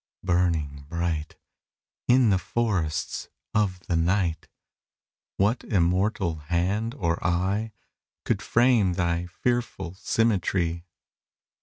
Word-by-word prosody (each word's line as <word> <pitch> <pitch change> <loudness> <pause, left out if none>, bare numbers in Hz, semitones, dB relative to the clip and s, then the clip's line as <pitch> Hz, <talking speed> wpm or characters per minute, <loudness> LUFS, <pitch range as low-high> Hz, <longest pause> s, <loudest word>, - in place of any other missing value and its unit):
burning 85 -6 0
bright, 85 -2 -2 0.7
In 125 -3 +5
the 95 - +3
forests 95 -9 -1 0.2
of 95 -4 +1
the 90 - -2
night, 85 -1 +1 0.9
What 105 +5 +2
immortal 90 -2 +1
hand 90 - -1
or 85 -7 -1
eye 95 +5 0 0.5
Could - - 0
frame 120 -6 +3
thy 85 -1 0
fearful 95 -3 -2
symmetry? 95 -5 0
90 Hz, 95 wpm, -26 LUFS, 85-105 Hz, 0.9 s, In